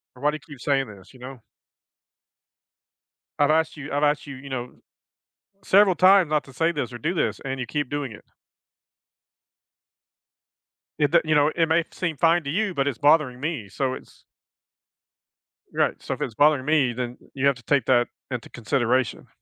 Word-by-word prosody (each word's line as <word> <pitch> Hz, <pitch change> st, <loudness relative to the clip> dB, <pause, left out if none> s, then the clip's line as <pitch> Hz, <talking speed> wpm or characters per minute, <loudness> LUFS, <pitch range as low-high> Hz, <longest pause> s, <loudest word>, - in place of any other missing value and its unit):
"Why 145 Hz, +4 st, +1 dB
do -, -, -7 dB
you -, -, -12 dB
keep 125 Hz, -, -17 dB
saying 135 Hz, -1 st, +1 dB
this," 100 Hz, +4 st, -14 dB
you 125 Hz, -, -16 dB
know? 130 Hz, -1 st, -9 dB, 2.0 s
"I've 145 Hz, +1 st, +4 dB
asked 160 Hz, 0 st, +1 dB
you 145 Hz, 0 st, -8 dB
I've 145 Hz, +1 st, 0 dB
asked 150 Hz, 0 st, +1 dB
you," 140 Hz, -, -7 dB
you 140 Hz, +1 st, -11 dB
know, 125 Hz, -2 st, -5 dB, 0.9 s
"several 195 Hz, -2 st, +5 dB
times 185 Hz, -3 st, +5 dB
not 150 Hz, -1 st, +1 dB
to 135 Hz, -, -15 dB
say 165 Hz, +5 st, +1 dB
this 140 Hz, -6 st, -4 dB
or 120 Hz, -, -7 dB
do 160 Hz, +8 st, -2 dB
this, 110 Hz, -, -1 dB
and 135 Hz, 0 st, -3 dB
you 125 Hz, -, -3 dB
keep 145 Hz, -3 st, -2 dB
doing 145 Hz, -4 st, -3 dB
it." 105 Hz, -, -13 dB, 2.7 s
It 145 Hz, -2 st, +2 dB
the, -, -, +6 dB
you 155 Hz, 0 st, +1 dB
know, 150 Hz, +1 st, +3 dB
it 165 Hz, -1 st, +1 dB
may 160 Hz, +1 st, +2 dB
seem 170 Hz, -5 st, -3 dB
fine 170 Hz, +2 st, +3 dB
to 140 Hz, -, -3 dB
you, 200 Hz, +2 st, -1 dB
but 140 Hz, 0 st, +1 dB
it's 130 Hz, -, -4 dB
bothering 145 Hz, -4 st, +3 dB
me 140 Hz, -8 st, -4 dB
so 130 Hz, +5 st, -2 dB
it's -, -, -14 dB, 1.5 s
Right, -, -, 0 dB
"So -, -, -3 dB
if -, -, -8 dB
it's 115 Hz, -, -3 dB
bothering 145 Hz, -1 st, +3 dB
me, 145 Hz, -4 st, +2 dB
then 125 Hz, 0 st, -5 dB, 0.2 s
you 140 Hz, 0 st, -1 dB
have 140 Hz, -2 st, +3 dB
to 120 Hz, -, -14 dB
take 140 Hz, -3 st, +1 dB
that 120 Hz, -2 st, +3 dB, 0.2 s
into 125 Hz, -2 st, -5 dB
consideration." 120 Hz, +2 st, -1 dB
140 Hz, 185 wpm, -24 LUFS, 125-155 Hz, 2.7 s, the